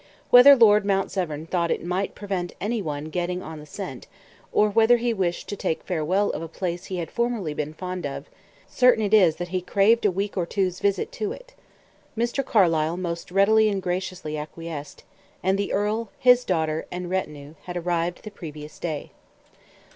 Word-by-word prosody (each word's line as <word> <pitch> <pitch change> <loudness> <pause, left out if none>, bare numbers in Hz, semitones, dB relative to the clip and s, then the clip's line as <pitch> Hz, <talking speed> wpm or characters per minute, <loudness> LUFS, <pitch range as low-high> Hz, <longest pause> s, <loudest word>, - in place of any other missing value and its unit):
Whether 260 +3 +10
Lord 210 -4 +6
Mount 195 -1 0
Severn 160 -5 -3
thought 170 0 -1
it - - -2
might 185 +3 -2
prevent 190 -4 -4
any 220 +3 -1
one 150 -2 -5
getting 180 +1 -2
on 160 -1 -8
the 150 - -12
scent, 165 -7 -7 0.4
or 210 - +4
whether 225 +3 +4
he 235 0 0
wished 180 -4 -2
to - - -3
take 160 - -2
farewell 185 +4 0
of - - -5
a 165 - -5
place 175 +1 -4
he 185 - -5
had 165 -2 -4
formerly 235 -9 -1
been 150 +1 -4
fond 180 -2 -4
of, 140 +1 -7 0.4
certain 250 -3 +4
it 205 - -2
is 180 -7 +6
that 175 +1 -5
he 185 0 -1
craved 205 +5 +3
a 210 - +4
week 200 +2 -3
or 175 -3 -1
two's 185 -2 -1
visit 200 - 0
to 435 -3 -3
it. - - -14 0.6
Mr. 240 +4 0
Carlyle 165 -7 +2
most 170 -2 -4
readily 215 +4 +4
and 195 -2 -2
graciously 180 -4 -3
acquiesced; 155 -1 -8 0.4
and 190 +1 +2
the 200 0 -2
earl, 210 +2 -1
his 250 0 +5
daughter, 160 -3 -1
and 180 0 -5
retinue 150 -6 -4
had 180 -1 -5
arrived 175 0 -2
the 215 - -8
previous 155 -6 -9
day. 155 -4 -4
185 Hz, 185 wpm, -24 LUFS, 165-210 Hz, 0.6 s, Whether